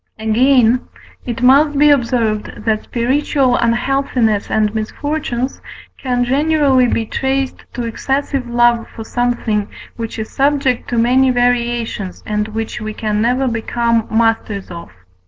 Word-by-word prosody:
Again, 240 +2 +3 0.4
it 240 0 -4
must 285 +3 +5
be 295 +1 +6
observed, 230 -6 0
that 220 -1 0
spiritual 260 +1 +1
unhealthiness 235 -3 0
and 215 -1 +1
misfortunes 255 +3 -3 0.4
can 250 -2 0
generally 275 -1 +3
be 230 -1 -1
traced 265 +3 -2
to 245 - -4
excessive 265 +2 -2
love 240 -1 +2
for 225 - -9
something 235 -3 -1 0.3
which 230 -1 -5
is 220 -1 -5
subject 275 -3 0
to 240 - -1
many 255 +3 +3
variations, 240 -5 -1
and 210 0 -1
which 220 0 -5
we 215 0 -5
can 210 -1 -1
never 250 +3 +1
become 230 -1 0
masters 220 -4 0
of. 170 -1 -8
240 Hz, 130 wpm, -17 LUFS, 220-265 Hz, 0.4 s, be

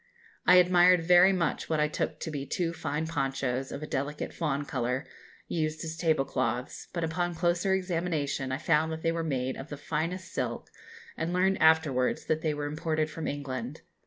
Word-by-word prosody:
I 180 - +8
admired 180 -1 +6
very 180 +2 +7
much 175 -4 -1
what 160 -1 +1
I 150 - +3
took 150 - -3
to 160 - -3
be 145 -2 -3
two 170 +3 -1
fine 155 -1 -2
ponchos, 135 -4 -2
of 140 - -5
a - - -2
delicate 145 +1 -3
fawn 145 -3 -1
colour, 125 0 -2 0.4
used 155 -1 -2
as 160 0 -4
tablecloths, 135 -7 -1
but 170 -2 -3
upon 175 +2 -1
a - - -10
closer 175 +3 +1
examination 165 -7 -1
I 130 - 0
found 160 +1 +2
that 160 0 -5
they 165 - +2
were 165 0 -2
made 130 -4 -2
of 135 +4 -8
the 145 - -6
finest 160 +5 -3
silk, - - -3 0.4
and 165 - -2
learned 190 +1 +2
afterwards 155 -5 +3
that 155 0 0
they 155 -2 0
were 145 0 -3
imported 155 +1 -1
from 160 0 -5
England. 135 -1 -4
155 Hz, 190 wpm, -29 LUFS, 140-170 Hz, 0.4 s, I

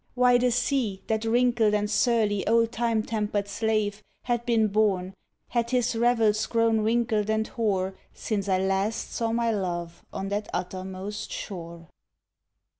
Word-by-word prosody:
Why 250 -1 +5
the 250 0 +3
sea, 240 -5 0
That 220 0 -1
wrinkled 235 -2 +3
and 210 0 0
surly 210 -2 +1
old 230 +1 +3
time 230 -2 0
tempered 210 -2 -2
slave, 215 -1 -1 0.2
Had 240 -1 -1
been 225 -2 +3
born, 195 -3 +1 0.4
had 235 -1 0
his 245 -2 +1
revels, 225 -2 +2
grown 230 -1 +2
wrinkled 220 -1 +1
and 220 0 +1
hoar 195 -5 -1 0.2
Since 200 -3 -3
I 190 - +3
last 195 +3 -1
saw 230 -1 -1
my 230 0 +1
love 175 -4 -3
on 195 - -4
that 205 +1 -2
uttermost 190 +3 -5
shore. 170 -3 -7
215 Hz, 145 wpm, -26 LUFS, 200-230 Hz, 0.4 s, Why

